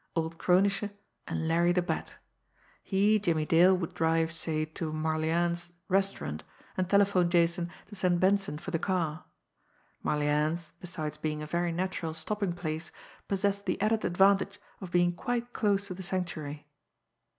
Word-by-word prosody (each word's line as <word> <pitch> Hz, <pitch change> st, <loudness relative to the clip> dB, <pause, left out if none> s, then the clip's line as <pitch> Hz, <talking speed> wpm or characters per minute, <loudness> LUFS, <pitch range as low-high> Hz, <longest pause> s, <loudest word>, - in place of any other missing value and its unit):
Old 165 Hz, 0 st, -2 dB
Kronische 195 Hz, +3 st, +3 dB, 0.4 s
and 160 Hz, -, -2 dB
Larry 170 Hz, +2 st, +3 dB
the 180 Hz, 0 st, +2 dB
Bat. 175 Hz, -, -3 dB, 0.7 s
He, 205 Hz, +2 st, +3 dB
Jimmie 165 Hz, -6 st, +1 dB
Dale, 180 Hz, +4 st, +5 dB
would 170 Hz, -3 st, -4 dB
drive, 165 Hz, 0 st, +1 dB
say, 160 Hz, -2 st, -1 dB
to 155 Hz, 0 st, -5 dB
Marlianne's 165 Hz, +2 st, 0 dB, 0.2 s
restaurant, 195 Hz, -, 0 dB, 0.3 s
and 185 Hz, -1 st, -1 dB
telephone 200 Hz, -3 st, +4 dB
Jason 170 Hz, 0 st, +2 dB, 0.2 s
to 210 Hz, -, -15 dB
send 180 Hz, -3 st, +1 dB
Benson 195 Hz, -3 st, +2 dB
for 155 Hz, -, -7 dB
the 165 Hz, -, 0 dB
car 165 Hz, -5 st, -1 dB, 0.8 s
Marlianne's, 150 Hz, +3 st, 0 dB
besides 170 Hz, -4 st, -4 dB
being 150 Hz, -1 st, -3 dB
a -, -, -4 dB
very 170 Hz, +2 st, 0 dB
natural 170 Hz, -2 st, -2 dB
stopping 195 Hz, +3 st, -1 dB
place, 160 Hz, -1 st, -4 dB, 0.4 s
possessed 200 Hz, +1 st, 0 dB
the 185 Hz, -, 0 dB
added 215 Hz, +2 st, +1 dB
advantage 195 Hz, +2 st, +3 dB, 0.2 s
of 190 Hz, -, -7 dB
being 175 Hz, 0 st, +3 dB
quite 240 Hz, +6 st, -3 dB
close 200 Hz, -3 st, +1 dB
to 190 Hz, -, -5 dB
the 185 Hz, -, -8 dB
Sanctuary. 160 Hz, -6 st, -3 dB
175 Hz, 150 wpm, -30 LUFS, 160-195 Hz, 0.8 s, Dale